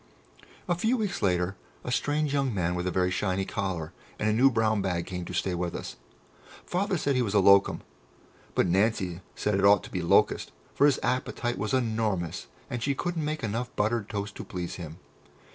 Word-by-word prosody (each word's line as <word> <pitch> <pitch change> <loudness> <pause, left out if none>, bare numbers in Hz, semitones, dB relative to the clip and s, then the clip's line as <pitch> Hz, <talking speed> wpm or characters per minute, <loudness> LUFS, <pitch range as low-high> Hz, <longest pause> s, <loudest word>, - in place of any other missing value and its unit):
A 175 - +2
few 220 +9 +1
weeks 210 -5 -2
later 90 0 +1 0.3
a 125 - -4
strange 145 +3 0
young 135 -2 +1
man 90 -2 0
with 90 0 -2
a - - 0
very 90 0 +1
shiny 95 0 0
collar 95 -7 -3 0.2
and 105 - -1
a 105 - +3
new 130 +5 +6
brown 110 -3 +1
bag 90 -3 -1
came 90 -2 -5
to - - -7
stay 95 - 0
with 85 0 -2
us. - - -6 0.7
Father 195 +1 0
said 140 -3 0
he 125 - +2
was 105 -4 -1
a - - +6
"locum," 100 0 +5 0.7
but - - +3
Nancy 95 -1 +1
said 105 - 0
it - - 0
ought 100 0 +6
to - - -10
be 90 - -2
"locust," 85 - +3 0.2
for 145 - +5
his 140 - +3
appetite 120 -2 -1
was 105 +2 -2
enormous, 110 -9 -1 0.2
and 120 - -4
she 140 +3 0
couldn't 170 +1 -2
make 155 -1 -3
enough 115 +3 -3
buttered 110 0 0
toast 100 0 -4
to - - -5
please 90 -2 -5
him. 80 -2 -8
105 Hz, 200 wpm, -28 LUFS, 90-130 Hz, 0.7 s, new